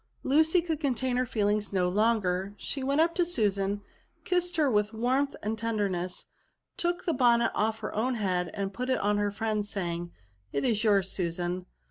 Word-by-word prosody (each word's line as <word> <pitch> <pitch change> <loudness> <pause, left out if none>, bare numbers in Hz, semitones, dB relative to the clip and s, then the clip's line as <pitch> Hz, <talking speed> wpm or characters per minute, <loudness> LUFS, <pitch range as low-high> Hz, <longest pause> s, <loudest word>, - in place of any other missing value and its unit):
Lucy 320 +5 +4
could 320 -3 -2
contain 260 -3 0
her 250 0 +1
feelings 210 -1 0
no 185 -2 +2
longer; 200 -1 +1
she 275 - -3
went 275 +3 +1
up 335 +1 +4
to 350 - +2
Susan, 205 - 0 0.4
kissed 355 -1 0
her 305 -2 +4
with 210 -2 +1
warmth 260 +5 +1
and 215 +1 -2
tenderness, 200 -6 -1 0.5
took 350 0 -1
the 335 - +1
bonnet 240 -3 +4
off 220 +1 0
her - - -4
own 245 +4 0
Iiead 180 -5 0
and 200 -1 -3
put 250 +6 -3
it 260 - +3
on 205 +1 +1
that - - +1
of - - +2
her 205 - -1
friend; 215 0 -1
saying, 175 -4 -4 0.2
" 95 0 -39
It 140 - 0
is 225 -2 +2
yours, 200 -3 +3
Susan." 175 0 -2
215 Hz, 195 wpm, -29 LUFS, 195-260 Hz, 0.5 s, Lucy